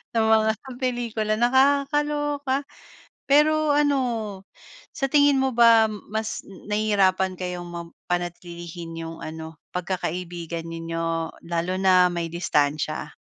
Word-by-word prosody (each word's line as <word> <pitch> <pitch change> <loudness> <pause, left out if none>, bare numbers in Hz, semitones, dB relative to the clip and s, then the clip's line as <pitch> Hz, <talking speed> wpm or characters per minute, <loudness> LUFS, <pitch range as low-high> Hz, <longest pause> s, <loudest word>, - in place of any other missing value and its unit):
na 225 - +3
mga 220 0 +4
sa 265 - -14
pelikula. 235 -4 -1
Nakakaloka. 280 +2 +2 0.7
Pero 305 +1 +4
ano, 290 -2 +3 1.0
sa 270 - 0
tingin 285 -1 +5
mo 265 0 +1
ba, 230 -1 +6 0.3
mas 220 0 -3
nahihirapan 195 -2 +1
kayong 180 -1 -5
mapanatlilihin 170 -1 -6
yung 165 0 -7
ano, 160 0 -8 0.2
pagkakaibigan 175 -2 -4
ninyo, 165 0 -3 0.2
lalo 170 +2 -1
na 185 -1 +5
may 170 -1 -2
distansiya? 150 -2 -1
185 Hz, 105 wpm, -24 LUFS, 170-260 Hz, 1.0 s, ba